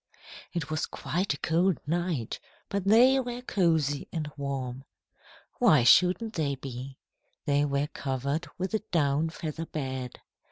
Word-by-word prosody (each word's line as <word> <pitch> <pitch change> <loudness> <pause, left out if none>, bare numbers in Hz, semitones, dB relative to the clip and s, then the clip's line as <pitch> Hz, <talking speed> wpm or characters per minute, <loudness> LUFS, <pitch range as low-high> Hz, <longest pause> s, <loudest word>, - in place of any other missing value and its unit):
It 160 -3 -3
was 155 - -1
quite 180 -2 -2
a - - -15
cold 170 +2 +2
night, 165 -6 -1 0.3
but 200 -1 -2
they 245 +6 +6
were 245 -1 -4
cosy 160 - +1
and 155 -2 -3
warm. 135 -2 -4 0.8
Why 160 - +6
shouldn't 185 - +5
they 145 -6 0
be? 130 0 -7 0.5
They 145 0 +3
were 140 0 0
covered 140 +3 -3
with 185 +4 -3
a 220 - +2
down 155 -5 +1
feather 160 -1 -5
bed. 130 -4 -4
155 Hz, 135 wpm, -28 LUFS, 140-180 Hz, 0.8 s, they